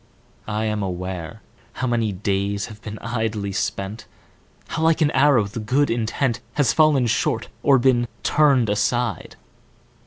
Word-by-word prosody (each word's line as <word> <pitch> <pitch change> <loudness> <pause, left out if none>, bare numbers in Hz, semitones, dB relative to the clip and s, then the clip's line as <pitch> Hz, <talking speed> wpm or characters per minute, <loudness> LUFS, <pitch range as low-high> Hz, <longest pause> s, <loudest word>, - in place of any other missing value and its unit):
I 110 +1 -1
am 105 -1 -1
aware 90 -3 -5 0.3
How 130 - -3
many 115 -3 0
days 100 +1 -1
have 105 -2 -12
been 105 0 -7
idly 110 -3 -2
spent; 100 +2 -3 0.6
How 160 - -3
like 160 +1 +3
an 150 -1 +3
arrow 135 -4 +4
the 100 +3 -6
good 130 +6 +1
intent 120 +1 -1
Has 145 -6 +2
fallen 155 -5 +4
short 115 - 0
or 140 -2 +5
been 120 -1 +2 0.2
turned 140 -6 +3
aside. 105 0 -1
115 Hz, 145 wpm, -22 LUFS, 105-130 Hz, 0.6 s, or